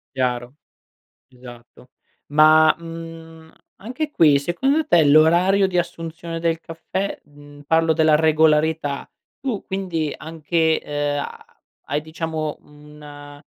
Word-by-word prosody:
Chiaro. 125 Hz, -1 st, -2 dB, 0.7 s
Esatto. 125 Hz, -1 st, -15 dB, 0.4 s
Ma, 155 Hz, +1 st, +5 dB
mhmm, 165 Hz, -1 st, -11 dB, 0.3 s
anche 295 Hz, +8 st, -4 dB
qui, 150 Hz, -, +4 dB
secondo 265 Hz, -, 0 dB
te 170 Hz, -, +4 dB
l'orario 170 Hz, +7 st, +4 dB
di 180 Hz, -1 st, -2 dB
assunzione 165 Hz, -1 st, -4 dB
del 165 Hz, -1 st, -1 dB
caffè 185 Hz, +4 st, -5 dB
mhmm, 145 Hz, 0 st, -16 dB
parlo 165 Hz, 0 st, +3 dB
della 160 Hz, -1 st, +3 dB
regolarità, 155 Hz, -1 st, +1 dB, 0.3 s
tu 250 Hz, -6 st, -3 dB
quindi 175 Hz, -6 st, -3 dB
anche, 160 Hz, +1 st, -1 dB
ehm, 145 Hz, 0 st, -2 dB
ha -, -, -7 dB, 0.5 s
hai 145 Hz, +2 st, -1 dB
diciamo 160 Hz, -1 st, -4 dB
un 145 Hz, -1 st, -14 dB
160 Hz, 110 wpm, -21 LUFS, 145-165 Hz, 0.7 s, Ma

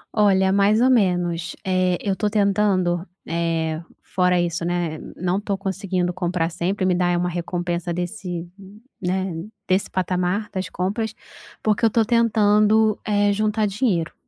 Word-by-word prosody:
Olha, 190 Hz, -3 st, +4 dB
mais 200 Hz, +2 st, +3 dB
ou 260 Hz, +2 st, +4 dB
menos. 175 Hz, -6 st, +1 dB
Eh, 185 Hz, -1 st, +1 dB
eu 200 Hz, -2 st, -1 dB
estou 210 Hz, +2 st, -1 dB
tentando, 195 Hz, -4 st, +1 dB, 0.2 s
eh, 165 Hz, -1 st, -1 dB, 0.2 s
fora 180 Hz, -1 st, +1 dB
isso, 170 Hz, -1 st, -1 dB
né. 170 Hz, -3 st, -2 dB, 0.2 s
Não 180 Hz, +2 st, -1 dB
estou 200 Hz, -1 st, -2 dB
conseguindo 190 Hz, -2 st, -2 dB
comprar 175 Hz, -2 st, -1 dB
sempre, 185 Hz, +4 st, -2 dB
e -, -, +3 dB
me 180 Hz, -, +3 dB
dar 175 Hz, -1 st, +1 dB
uma 180 Hz, 0 st, 0 dB
recompensa 175 Hz, 0 st, -3 dB
desse, 175 Hz, 0 st, -4 dB, 0.5 s
né, 185 Hz, 0 st, -1 dB, 0.3 s
desse 185 Hz, +2 st, +1 dB
patamar, 185 Hz, +3 st, -1 dB
das 185 Hz, -2 st, -3 dB
compras. 205 Hz, +5 st, -2 dB, 0.5 s
Porque 215 Hz, +1 st, +1 dB
eu 225 Hz, -, +7 dB
estou 225 Hz, 0 st, +2 dB
tentando, 215 Hz, -2 st, +3 dB
eh, 205 Hz, -1 st, +2 dB
juntar 215 Hz, +1 st, +1 dB
dinheiro. 195 Hz, -6 st, 0 dB
185 Hz, 145 wpm, -22 LUFS, 175-205 Hz, 0.5 s, eu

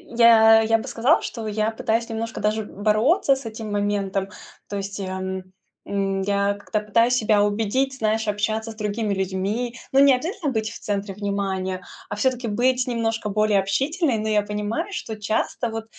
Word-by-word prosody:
я 225 Hz, -1 st, +7 dB
я 225 Hz, 0 st, +3 dB
бы 225 Hz, +4 st, -7 dB
сказала, 260 Hz, +4 st, +3 dB
что 225 Hz, -2 st, -5 dB
я 215 Hz, +1 st, 0 dB
пытаюсь 225 Hz, +1 st, -1 dB
немножко 225 Hz, 0 st, -4 dB
даже 215 Hz, +1 st, 0 dB
бороться 225 Hz, -, +2 dB
с 265 Hz, -1 st, -9 dB
этим 220 Hz, -1 st, -6 dB
моментом, 200 Hz, -1 st, -1 dB, 0.4 s
то 205 Hz, -, -3 dB
есть 195 Hz, 0 st, -5 dB
я, 190 Hz, -1 st, -4 dB
м, 190 Hz, 0 st, -5 dB, 0.3 s
м, 195 Hz, -1 st, -1 dB
я 200 Hz, +1 st, +1 dB
как-то 205 Hz, +1 st, -3 dB
пытаюсь 230 Hz, +4 st, +2 dB
себя 215 Hz, -3 st, +3 dB
убедить, 225 Hz, +6 st, 0 dB
знаешь, 220 Hz, -1 st, 0 dB
общаться 215 Hz, +2 st, -1 dB
с -, -, -12 dB
другими 210 Hz, 0 st, -2 dB
людьми. 195 Hz, +6 st, -2 dB, 0.2 s
Но 270 Hz, -, +5 dB
не 280 Hz, -1 st, +7 dB
обязательно 315 Hz, +3 st, -2 dB
быть 220 Hz, -3 st, -1 dB
в 230 Hz, -, -9 dB
центре 200 Hz, -1 st, -3 dB
внимания, 190 Hz, -2 st, -2 dB, 0.3 s
а -, -, -3 dB
всё-таки 250 Hz, +1 st, 0 dB
быть 250 Hz, +4 st, +1 dB
немножко 225 Hz, -2 st, -1 dB
более 210 Hz, 0 st, +2 dB
общительной. 270 Hz, -, 0 dB
Но 215 Hz, 0 st, -3 dB
я 210 Hz, -1 st, +3 dB
понимаю, 210 Hz, -, -3 dB
что 225 Hz, -, -5 dB
часто 220 Hz, +3 st, -1 dB
вот 225 Hz, 0 st, -5 dB
215 Hz, 175 wpm, -23 LUFS, 205-230 Hz, 0.4 s, я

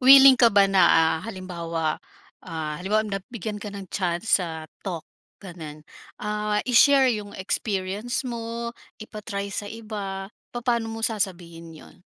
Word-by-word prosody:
willing 270 Hz, +1 st, +10 dB
ka 240 Hz, -2 st, +6 dB
ba 200 Hz, -2 st, +5 dB
na, 195 Hz, -1 st, +3 dB
ah, 160 Hz, 0 st, +4 dB
halimbawa, 170 Hz, -5 st, -3 dB, 0.4 s
ah, 160 Hz, -3 st, -5 dB
halimbawa 210 Hz, +4 st, +1 dB
na 195 Hz, -2 st, -3 dB
bigyan 215 Hz, -2 st, -5 dB
ka 210 Hz, -, -5 dB
ng 200 Hz, -1 st, -7 dB
chance 180 Hz, +2 st, +1 dB
sa 160 Hz, -3 st, -5 dB, 0.2 s
talk 175 Hz, -5 st, -5 dB, 0.3 s
ganun, 160 Hz, -5 st, -10 dB, 0.3 s
ah, 210 Hz, 0 st, -2 dB
i-share 260 Hz, +1 st, +6 dB
yung 205 Hz, -2 st, -6 dB
experience 200 Hz, +5 st, -2 dB
mo, 235 Hz, -1 st, -4 dB, 0.2 s
ipa-try 205 Hz, -2 st, -6 dB
sa 205 Hz, +1 st, -3 dB
iba, 205 Hz, -3 st, -6 dB, 0.2 s
papaano 235 Hz, -2 st, 0 dB
mo 225 Hz, 0 st, -3 dB
sasabihin 170 Hz, -6 st, -3 dB
'yon? -, -, -15 dB
205 Hz, 140 wpm, -25 LUFS, 180-225 Hz, 0.4 s, willing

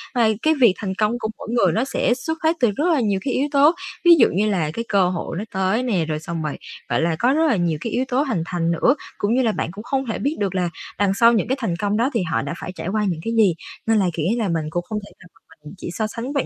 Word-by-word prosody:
Mà 235 Hz, -2 st, +4 dB
cái 315 Hz, -, +3 dB
việc 230 Hz, -6 st, +7 dB
thành 190 Hz, -2 st, -4 dB
công 215 Hz, +4 st, 0 dB
của 220 Hz, -, -3 dB
mỗi -, -, -9 dB
người 215 Hz, -7 st, +3 dB
nó 225 Hz, -, +1 dB
sẽ 265 Hz, -2 st, +1 dB
xuất 320 Hz, +6 st, -4 dB
phát 320 Hz, +1 st, +3 dB
từ 240 Hz, -4 st, +3 dB
rất 295 Hz, -, -1 dB
là 300 Hz, -, +2 dB
nhiều 205 Hz, -5 st, +1 dB
cái 265 Hz, -, 0 dB
yếu 280 Hz, -, +1 dB
tố 285 Hz, +2 st, +6 dB, 0.3 s
ví 345 Hz, -1 st, +9 dB
dụ -, -, +7 dB
như 210 Hz, +3 st, +2 dB
là 170 Hz, -7 st, 0 dB
cái 230 Hz, +8 st, -4 dB
cơ 195 Hz, -3 st, +3 dB
hội 175 Hz, -2 st, -4 dB
nó 200 Hz, -, -3 dB
tới 190 Hz, +5 st, +1 dB
nè, 195 Hz, -10 st, 0 dB
rồi 155 Hz, -1 st, -3 dB
xong 165 Hz, +1 st, -5 dB
rồi, 150 Hz, -, -3 dB, 0.3 s
gọi -, -, +1 dB
là, 165 Hz, 0 st, +1 dB
có 250 Hz, +3 st, +3 dB
rất 320 Hz, +2 st, +3 dB
là 275 Hz, -, +3 dB
nhiều 170 Hz, -4 st, 0 dB
cái 230 Hz, -, -4 dB
yếu 255 Hz, +2 st, 0 dB
tố 255 Hz, +1 st, +1 dB
hình 260 Hz, -, -1 dB
thành 170 Hz, 0 st, -1 dB
nữa, 205 Hz, -, +3 dB, 0.2 s
cũng 205 Hz, +2 st, 0 dB
như 260 Hz, -, +3 dB
là 230 Hz, -3 st, +2 dB
bạn 205 Hz, -, -3 dB
cũng 205 Hz, +4 st, -9 dB
không 265 Hz, +2 st, -1 dB
thể 225 Hz, -, -3 dB
biết 285 Hz, +4 st, -1 dB
được 195 Hz, -2 st, -1 dB
là 180 Hz, -2 st, 0 dB, 0.3 s
đằng 200 Hz, -1 st, +3 dB
sau 230 Hz, +4 st, +5 dB
những 215 Hz, -3 st, +1 dB
cái 265 Hz, +3 st, 0 dB
thành 220 Hz, -9 st, -1 dB
công 205 Hz, +3 st, -1 dB
đó 240 Hz, +4 st, +2 dB
thì 230 Hz, -, +1 dB
họ 160 Hz, -3 st, -1 dB
đã 140 Hz, +3 st, -4 dB
phải 180 Hz, -, -5 dB
trải -, -, -6 dB
qua 210 Hz, +3 st, 0 dB
những 170 Hz, -3 st, -3 dB
cái 230 Hz, -, -2 dB
gì. 205 Hz, -6 st, +5 dB, 0.3 s
Nên 225 Hz, -1 st, +4 dB
là, 195 Hz, -, +2 dB
kiểu 160 Hz, 0 st, -1 dB
là, 225 Hz, -4 st, 0 dB
mình 165 Hz, -2 st, -1 dB
cũng 175 Hz, +3 st, -2 dB
không 215 Hz, -1 st, -2 dB
thể -, -, -16 dB
nào 175 Hz, -, -15 dB
mà -, -, -26 dB, 0.3 s
mình 150 Hz, -, -9 dB
chỉ 175 Hz, -, -6 dB
so 215 Hz, +2 st, -1 dB
sánh 230 Hz, +5 st, -5 dB
bản 280 Hz, -, 0 dB
215 Hz, 310 wpm, -21 LUFS, 180-245 Hz, 0.3 s, ví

